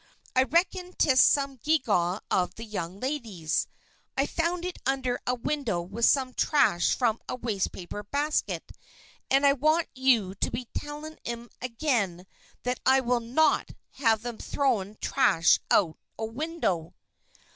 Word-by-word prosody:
"I 260 - +6
reckon 360 +3 0
'tis 260 -3 +5
some 275 -2 +3
gewgaw 215 - +1
of 180 -1 +1
the 225 - -7
young 195 -3 -5
ladies. 220 - -2 0.5
I 275 - +3
found 340 +3 -1
it 360 - -5
under 260 -1 0
a 250 - +2
window 245 -6 -1
with 200 +7 -1
some 260 -2 +3
trash 260 - +3
from 230 -3 0
a - - -1
wastepaper 205 -5 -3
basket, 295 +2 -1 0.6
and 275 +1 +4
I 280 - +6
want 310 +5 +2
you 245 -8 +2
to 195 - -2
be 245 - -4
tellin' 300 +2 -6
'em 235 0 -5
again 230 - -1 0.4
that 250 0 -1
I 265 0 +5
will 245 -1 +1
not 250 +7 +2 0.2
have 225 -4 +1
'em 240 -2 -5
throwing 215 -8 0
trash 165 0 +4
out 165 -5 +3 0.2
o' 220 - -2
window." 225 - -2
250 Hz, 145 wpm, -27 LUFS, 210-285 Hz, 0.6 s, I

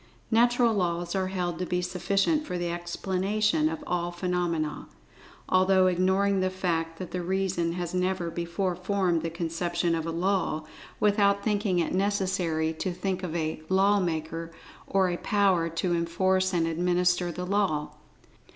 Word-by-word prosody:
"Natural 240 0 +4
Laws" 175 -3 -1
are 190 -1 0
held 180 -2 -2
to 180 - -1
be 180 - 0
sufficient 195 - 0
for 180 -12 -4
the 175 -1 -2
explanation 195 - 0
of 315 -2 -5
all 175 -4 -1
phenomena, 175 -4 -2 0.6
although 185 0 +4
ignoring 190 +2 +2
the 185 0 +1
fact 165 -3 -2
that 185 -1 -7
the 180 - -2
reason 180 -2 -1
has 175 -1 -4
never 180 -2 -1
before 170 +2 -2
formed 180 -2 0
the 165 - -2
conception 170 +1 -1
of 165 0 -2
a - - -1
"law," 175 -2 0 0.4
without 200 -1 +3
thinking 205 -3 +1
it 170 - 0
necessary 185 -5 0
to 185 +4 -3
think 185 +1 -2
of 175 -3 -4
a 155 -1 -2
"law 195 +2 +4
maker," 165 -1 -3 0.4
or 190 -1 +2
a 175 -1 -1
power 190 -5 +2
to 170 +2 -1
enforce 185 +3 +1
and 170 -3 +1
administer 175 +1 +1
the 180 +2 -5
law. 185 -6 0
180 Hz, 155 wpm, -27 LUFS, 170-195 Hz, 0.6 s, Natural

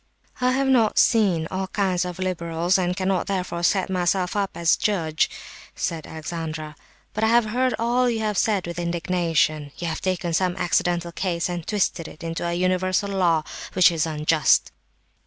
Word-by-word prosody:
"I 250 0 +3
have 270 +1 +1
not 235 -5 +3
seen 190 -9 +3
all 190 0 -2
kinds 185 -3 0
of 180 -1 -5
liberals, 175 -1 0
and 180 0 -1
cannot, 190 -1 0
therefore, 180 -3 -2
set 185 +2 +2
myself 185 0 0
up 200 -2 0
as 170 -1 +3
a - - -17
judge," 160 -7 +1 0.5
said 160 -2 -3
Alexandra, 160 -1 -6 0.4
"but 215 - -2
I - - +4
have 235 0 +4
heard 250 +4 0
all 245 +2 +2
you 225 -2 -1
have 210 -1 -1
said 205 -4 +1
with 170 0 -5
indignation. 170 -3 0
You 175 - -5
have 160 - -4
taken 185 -2 -1
some 180 +1 +1
accidental 175 -1 0
case 175 -1 -2
and 175 -2 -5
twisted 185 -5 0
it 155 - -12
into 165 0 -4
a 170 - -1
universal 185 +2 0
law, 170 -5 +2 0.3
which 180 -1 +6
is 165 -1 0
unjust." 155 -1 +2
180 Hz, 175 wpm, -23 LUFS, 165-195 Hz, 0.5 s, which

